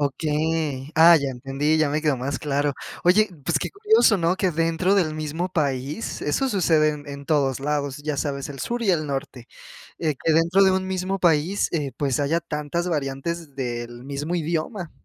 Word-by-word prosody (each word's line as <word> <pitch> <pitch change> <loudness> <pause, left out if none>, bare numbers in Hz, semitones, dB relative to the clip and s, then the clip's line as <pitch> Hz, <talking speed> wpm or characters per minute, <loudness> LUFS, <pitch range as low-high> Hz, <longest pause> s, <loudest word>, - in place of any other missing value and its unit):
Okey. 150 0 -1
Ah, 165 +2 +8
ya 140 -3 -1
entendí, 135 +5 -1
ya 155 -1 +2
me 150 +1 0
quedó 150 -3 +1
más 135 +3 -3
claro. 145 -1 0 0.3
Oye, 210 +5 +4 0.2
pues, 150 0 +1
qué - - -4
curioso, 420 - +4
¿no? 170 0 +1
que 190 -2 +1
dentro 165 +4 +1
del 165 -6 +1
mismo 155 +3 -3
país, 140 - -2
eso 265 - 0
sucede 165 -8 +3
en 150 -1 -8
en 140 0 -8
todos 140 -4 +1
lados, 145 -1 -2
ya 150 0 -4
sabes, 140 -1 -3
el 140 -2 -8
sur 240 0 -2
y 210 - +3
el 155 -4 +1
norte, 135 -3 -5 0.5
eh, 155 -3 0
que 160 - +3
dentro 170 +5 +4
de 190 - +5
un 190 0 -1
mismo 190 +1 -2
país, 170 +3 +2
eh, 145 -5 -1
pues 140 -3 -1
haya 145 +4 +1
tantas 160 +2 -3
variantes 150 0 -3
del 120 -2 -5
mismo 140 +4 -4
idioma. 170 +2 -2
155 Hz, 190 wpm, -23 LUFS, 140-170 Hz, 0.5 s, Ah